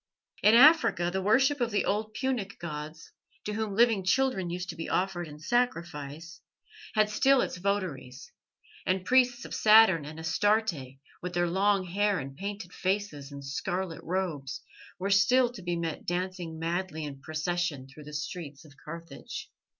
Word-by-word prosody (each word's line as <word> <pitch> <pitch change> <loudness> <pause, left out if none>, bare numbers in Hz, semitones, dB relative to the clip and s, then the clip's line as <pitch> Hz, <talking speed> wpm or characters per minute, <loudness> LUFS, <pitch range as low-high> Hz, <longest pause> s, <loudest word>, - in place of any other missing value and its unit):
In 215 +2 +6
Africa 240 - +6
the 190 - 0
worship 265 +8 +3
of 240 - +1
the 210 -2 0
old 215 +1 -1
Punic 245 -7 -2
gods, 155 -1 -7 0.3
to 210 - -3
whom 215 -2 -2
living 225 -3 +4
children 190 -3 +1
used 180 +2 -4
to 170 - -5
be 165 - -5
offered 180 -2 -1
in 150 -1 -10
sacrifice, 165 - -2 0.5
had 215 -1 +4
still 265 +6 +3
its - - -1
votaries, 175 -10 -3 0.5
and 185 0 0
priests 250 0 +3
of - - -8
Saturn 215 -7 +6
and 155 +2 -8
Astarte, 160 - 0 0.2
with 180 0 -5
their 175 0 +2
long 195 +2 +2
hair 200 +3 +1
and 135 -2 -6
painted 200 +1 -6
faces 185 -8 -2
and 140 -1 -8
scarlet 175 +5 -3
robes, 165 -7 -3 0.3
were 195 +2 -2
still 240 +6 +4
to 225 - -9
be 175 -1 -2
met 165 -2 -4
dancing 175 -2 -3
madly 165 0 -3
in 140 -2 -8
procession 155 -2 -2
through 145 +2 -13
the 150 - -10
streets 150 -1 -6
of 150 - -16
Carthage. 165 +2 -8
180 Hz, 160 wpm, -29 LUFS, 160-205 Hz, 0.5 s, In